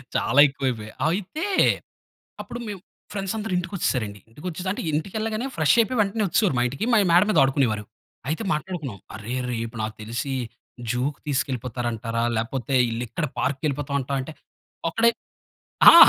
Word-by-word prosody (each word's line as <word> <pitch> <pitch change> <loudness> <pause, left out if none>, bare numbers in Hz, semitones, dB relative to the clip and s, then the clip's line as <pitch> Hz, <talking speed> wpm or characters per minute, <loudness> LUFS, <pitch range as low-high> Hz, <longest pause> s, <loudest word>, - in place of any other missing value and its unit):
చాలా 130 - +3
ఎక్కువ 135 0 -4
అయిపోయాయి. 110 -3 -5 0.2
అయితే, 200 - -2 1.0
అప్పుడు 240 - -6
మేము 200 -3 -5 0.3
ఫ్రెండ్స్ 195 0 -2
అందరు 215 -2 -3
ఇంటికొచ్చేసారండి. 130 - -1
ఇంటికొచ్చెసి 180 +8 -5
అంటే, - - -4
ఇంటికెళ్ళగానే 215 - -1
ఫ్రెష్ 155 -3 +4
అయిపోయి, 230 +2 +1
వెంటనే 210 +1 +1
వచ్చేవారు 185 - +2
మా - - +4
ఇంటికి. 140 - -3
మా - - +6
మేడ 175 +2 +7
మీద - - +3
ఆడుకునేవారు. 125 -6 +1 0.4
అయితే 160 +8 -1
మాట్లాడుకున్నాం. 150 - -3 0.2
"అరే 110 +3 -5 0.2
రేపు 115 0 -3
నాకు 110 0 -3
తెలిసి 120 +5 -3 0.6
జూకి 130 +4 -1
తీసుకెళ్ళిపోతారంటారా, 120 -4 -1
లేకపోతే 120 +3 -2 0.2
ఈళ్ళిక్కడ 120 +6 -2
పార్క్‌కి 140 +1 -1
వెళ్ళిపోతాం 140 -1 -1
అంటావా" 135 +1 -2
అంటే, 145 - -7 0.6
ఒక్కడే 230 +1 +4 0.8
ఆ! - - +8
140 Hz, 140 wpm, -25 LUFS, 120-185 Hz, 1.0 s, ఆ